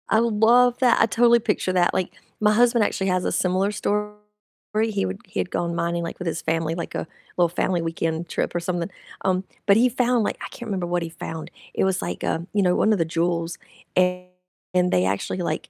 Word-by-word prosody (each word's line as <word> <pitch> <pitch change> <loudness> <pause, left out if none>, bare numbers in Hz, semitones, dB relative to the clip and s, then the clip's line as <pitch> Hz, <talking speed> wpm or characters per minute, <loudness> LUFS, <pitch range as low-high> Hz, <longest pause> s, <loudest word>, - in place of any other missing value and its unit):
I 220 - +4
love 235 +2 +4
that, 250 -3 +4
I - - +7
totally 235 +1 +4
picture 210 -4 -1
that, 180 -1 +3
like, 185 - -1 0.3
my 210 0 +4
husband 235 0 +4
actually 195 -1 -1
has 185 -1 +1
a - - 0
similar 185 +2 +1
story, 210 0 -1 0.7
he 200 - -1
would 95 0 -4
he - - -5
had 90 - -2
gone 170 -1 -1
mining, 170 0 -1
like, 170 - -5
with 180 - -4
his 165 - -2
family 165 0 -1
like, 170 - -5
a - - -3 0.3
little 175 -1 +4
family 175 +1 0
weekend 165 0 -2
trip, - - -2
or - - +2
something, 175 +1 -2 0.4
um, 185 -1 +1 0.2
but 200 0 +6
he 250 +2 +5
found, 245 -1 +1
like - - -2
I - - -4
can't 240 - -9
remember 190 -4 -2
what 175 0 0
he 165 - -5
found, 160 -1 -7 0.2
it - - 0
was 190 -1 +1
like, - - -4
um, 165 +2 -1
you 205 - +2
know, 180 -1 +3
1 215 - +3
of 205 - 0
the 165 - +2
jewels 170 +1 -1 0.4
and 180 0 -1
they 90 - +3
actually 100 - -1
like 175 - -3
180 Hz, 220 wpm, -23 LUFS, 170-210 Hz, 0.7 s, I